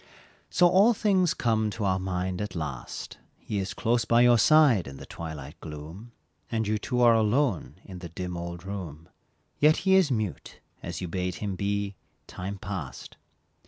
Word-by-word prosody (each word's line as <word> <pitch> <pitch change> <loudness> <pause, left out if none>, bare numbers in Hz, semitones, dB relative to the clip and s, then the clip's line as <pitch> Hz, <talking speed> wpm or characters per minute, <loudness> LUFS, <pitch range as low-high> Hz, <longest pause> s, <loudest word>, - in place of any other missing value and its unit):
So 180 - +5
all 200 +7 +5
things 190 -5 +2
come 110 -2 +1
to 105 0 -3
our 95 -1 +1
mind 95 0 -2
at 105 -3 -5
last, 75 -6 -6 0.2
He 105 - -4
is 95 -1 -4
close 120 +1 +1
by 115 +1 +4
your 120 -1 +6
side 140 - +5
in 70 0 -8
the - - -9
twilight 80 -1 -8
gloom, 80 +9 -9 0.4
And 110 -2 0
you 105 0 0
two 125 +3 -1
are 120 -1 +7
alone 110 - +1
in 95 -2 -9
the 85 -1 -8
dim 90 +1 -5
old 85 0 -6
room, 85 -6 -7 0.5
Yet 155 +2 +5
he 190 - +5
is 190 -5 +5
mute, 110 -7 -3 0.2
as - - -5
you 90 - -3
bade 90 +1 -2
him 100 -1 -4
be, 100 +1 -1 0.3
time 95 +2 -6
past. 95 -8 -7
100 Hz, 175 wpm, -27 LUFS, 90-120 Hz, 0.5 s, are